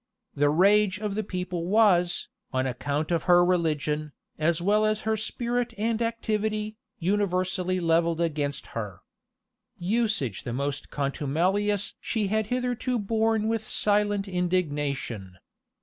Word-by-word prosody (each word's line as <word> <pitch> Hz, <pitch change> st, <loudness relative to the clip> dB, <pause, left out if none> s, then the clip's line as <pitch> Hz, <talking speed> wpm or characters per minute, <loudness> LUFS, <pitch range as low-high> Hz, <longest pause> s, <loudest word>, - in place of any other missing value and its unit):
The 145 Hz, +1 st, +2 dB
rage 200 Hz, +5 st, +4 dB
of 210 Hz, -1 st, -3 dB
the 215 Hz, +2 st, -1 dB
people 180 Hz, -3 st, -3 dB
was, 185 Hz, -4 st, +3 dB, 0.2 s
on 130 Hz, 0 st, 0 dB
account 145 Hz, +5 st, -2 dB
of 170 Hz, -2 st, 0 dB
her 175 Hz, 0 st, +6 dB
religion, 155 Hz, -4 st, 0 dB, 0.3 s
as 160 Hz, +2 st, +2 dB
well 205 Hz, +4 st, +3 dB
as 215 Hz, 0 st, +1 dB
her 220 Hz, 0 st, 0 dB
spirit 240 Hz, +2 st, -2 dB
and 225 Hz, +2 st, 0 dB
activity, 215 Hz, -2 st, -1 dB, 0.2 s
universally 185 Hz, -1 st, 0 dB
levelled 165 Hz, -1 st, +2 dB
against 150 Hz, -4 st, -1 dB
her. 105 Hz, -6 st, -5 dB, 0.8 s
Usage 200 Hz, -, 0 dB
the 120 Hz, -, -5 dB
most 140 Hz, +2 st, -3 dB
contumelious 180 Hz, +9 st, 0 dB
she 215 Hz, -4 st, -1 dB
had 215 Hz, 0 st, 0 dB
hitherto 250 Hz, +1 st, -1 dB
borne 220 Hz, 0 st, +1 dB
with 225 Hz, -1 st, -2 dB
silent 205 Hz, -1 st, +1 dB
indignation. 145 Hz, -, -2 dB
185 Hz, 125 wpm, -27 LUFS, 155-215 Hz, 0.8 s, her